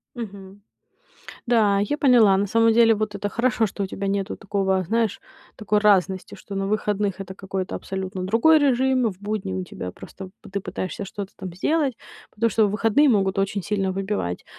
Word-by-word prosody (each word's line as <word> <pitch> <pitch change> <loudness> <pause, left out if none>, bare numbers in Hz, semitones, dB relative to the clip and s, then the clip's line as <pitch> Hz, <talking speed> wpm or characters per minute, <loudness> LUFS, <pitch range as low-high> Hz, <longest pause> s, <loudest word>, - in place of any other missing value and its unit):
Мгм. 200 -4 -9 0.9
Да, 215 -4 +3
я 205 +9 -1
поняла. 235 -9 +5
На 200 +1 +1
самом 230 +2 +3
деле 230 0 +5
вот 215 -1 -3
это 205 0 -3
хорошо, 230 +1 +1
что 200 0 -5
у - - -2
тебя 195 +1 -5
нету 195 0 -2
такого, 195 -1 0
знаешь, 225 +3 0 0.4
такой 210 0 +1
разности, 195 -3 +2
что 200 - -10
на 195 0 -1
выходных 205 -1 -1
это 190 -1 -7
какой-то 190 -1 -5
абсолютно 190 -1 -5
другой 230 +11 +4
режим, 260 -2 +2
в 185 - -20
будни 205 - -3
у 95 0 -2
тебя 90 0 -7
просто 190 -1 -11
пы 205 - -13
ты 200 +1 -2
пытаешься 185 +1 -5
что-то 195 0 -7
там 185 -2 -7
сделать, 285 - 0 0.4
потому 230 +2 +1
что 215 +1 +3
выходные 225 +8 +3
могут 195 -3 +1
очень 195 0 -1
сильно 195 0 -1
выбивать. 190 - -3
205 Hz, 180 wpm, -23 LUFS, 190-225 Hz, 0.9 s, поняла